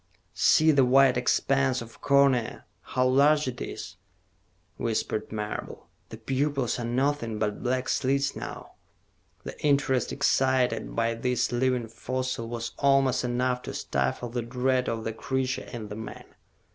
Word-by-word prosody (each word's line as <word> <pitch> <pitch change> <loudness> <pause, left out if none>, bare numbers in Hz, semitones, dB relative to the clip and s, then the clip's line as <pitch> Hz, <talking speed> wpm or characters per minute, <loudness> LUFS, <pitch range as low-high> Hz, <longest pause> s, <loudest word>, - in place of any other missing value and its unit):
"See 160 0 +4
the 140 -3 +4
white 130 +1 +5
expanse 130 +1 +1
of 115 0 -11
cornea, 140 -4 +2 0.2
how 130 - -1
large 145 +3 +4
it 125 -1 -5
is," - - -7 0.8
whispered 110 -1 -2
Marable. 105 -1 -5 0.2
"The 110 - -8
pupils 135 +2 -1
are 120 - -3
nothing 125 -2 0
but 105 -1 -2
black 130 +1 -1
slits 140 +1 0
now." - - -7 0.7
The - - -7
interest 140 -3 +2
excited 130 -4 +1
by 115 0 +1
this 125 +1 -1
living 125 -1 0
fossil 130 0 -4
was 115 -1 -4
almost 135 -2 +3
enough 125 +1 0
to - - -7
stifle 70 - -2
the 120 +1 -2
dread 125 +2 0
of 115 -1 -3
the 115 - -3
creature 130 +2 -2
in 110 -4 -7
the 105 - -6
man. 110 -1 -8
125 Hz, 145 wpm, -27 LUFS, 115-135 Hz, 0.8 s, white